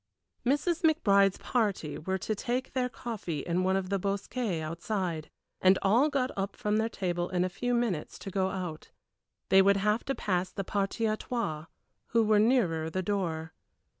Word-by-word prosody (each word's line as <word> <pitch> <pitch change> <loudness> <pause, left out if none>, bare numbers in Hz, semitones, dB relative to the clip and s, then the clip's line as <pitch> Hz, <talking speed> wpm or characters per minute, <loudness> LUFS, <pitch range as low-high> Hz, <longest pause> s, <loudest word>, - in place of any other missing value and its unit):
Mrs. 295 +6 +1
McBride's 200 - +4
party 205 -10 -1
were 190 +4 -1
to 215 - -2
take 250 +4 -2
their 255 -1 0
coffee 215 - -4
in 175 +3 0
one 190 +1 +2
of 190 -1 -1
the 200 - +1
bosquets 200 0 -2
outside, 170 0 -3 0.3
and 185 +1 +6
all 235 +10 +4
got 265 -3 0
up 195 0 -3
from 210 0 0
their 220 +1 +1
table 175 -4 -2
in 180 -1 +1
a - - -1
few 245 +7 -1
minutes 225 -10 -1
to 195 - -7
go 190 0 +1
out. 180 -5 -5 0.6
They 195 - +7
would 200 +1 +4
have 210 +3 +1
to 270 - -1
pass 180 -2 -1
the 195 - -4
partie 200 +3 -1
à 215 0 0
trois, 165 -11 -3 0.4
who 230 -1 +3
were 215 -1 +4
nearer 195 -9 +2
the 185 +3 -2
door. 165 -5 -2
195 Hz, 180 wpm, -30 LUFS, 180-230 Hz, 0.6 s, They